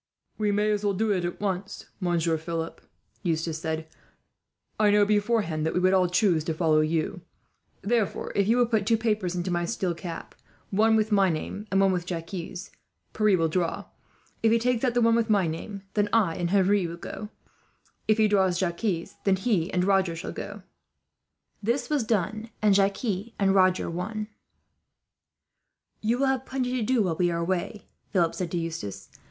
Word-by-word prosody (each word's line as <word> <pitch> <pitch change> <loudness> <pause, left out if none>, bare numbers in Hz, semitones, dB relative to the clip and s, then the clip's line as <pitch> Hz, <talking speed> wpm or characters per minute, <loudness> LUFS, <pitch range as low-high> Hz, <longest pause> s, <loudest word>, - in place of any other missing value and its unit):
"We 210 -1 +2
may 210 +1 +2
as 210 -1 -1
well 200 -1 +1
do 220 +2 +1
it 185 -3 0
at 175 - -4
once, 195 0 -3
Monsieur 170 -3 +1
Philip," 165 +1 -4 0.4
Eustace 165 -3 -1
said. 160 0 -3 0.9
"I 210 -1 +5
know, 205 0 +5
beforehand, 205 -6 +1
that 160 - -1
we - - +3
would 185 +1 +3
all 185 -2 +3
choose 180 -3 +2
to 160 - -2
follow 155 -2 +3
you; 160 +4 -1 0.6
therefore 220 0 0
if 200 -1 +1
you 230 +2 +3
will 245 - +5
put 220 -4 0
two 225 -1 +4
papers 210 -5 -1
into 180 +1 -2
my 175 0 0
steel 175 +1 -1
cap, 170 0 -7 0.4
one 220 +3 +4
with 215 0 +1
my 195 -2 +4
name, 195 +6 -4
and 195 - +2
one 195 -1 +4
with 180 -1 -2
Jacques', 165 -2 -5
Pierre 175 -4 -5 0.8
shall 165 -1 +2
draw. 170 +1 -1 0.6
If 225 - +4
he 230 - +5
takes 240 +1 0
out 245 -2 +1
the 245 - +3
one 230 0 +4
with 230 -1 +1
my 200 -4 +3
name, 190 +5 -5
then 205 -1 +1
I 200 -8 +3
and 175 -1 -1
Henri 195 -1 +3
will 170 +1 -7
go - - -8
with - - -7
you. 210 - -6 0.8
If 215 - +4
he 215 -1 +4
draws 190 -4 +2
Jacques, 175 0 -1
then 195 -1 +3
he 190 -3 0
and 180 -1 +1
Roger 190 -3 +2
shall 165 - -5
go." - - -7 1.0
This 235 +8 -1
was 290 -5 +2
done, 215 +1 -1
and 210 -2 +4
Jacques 195 +4 +2 0.3
and 195 -1 +3
Roger 185 -1 +3
won. 210 +5 -4 1.7
"You 225 +3 +1
will 275 - +2
have 265 -1 0
plenty 255 -1 -2
to - - -1
do, 230 0 +2
while 170 -4 -1
we 175 -1 +2
are 170 - -1
away," 180 +5 -2 0.2
Philip 170 -5 +2
said 180 -2 -3
to 175 - -2
Eustace. 165 - -5
195 Hz, 190 wpm, -26 LUFS, 170-215 Hz, 1.7 s, I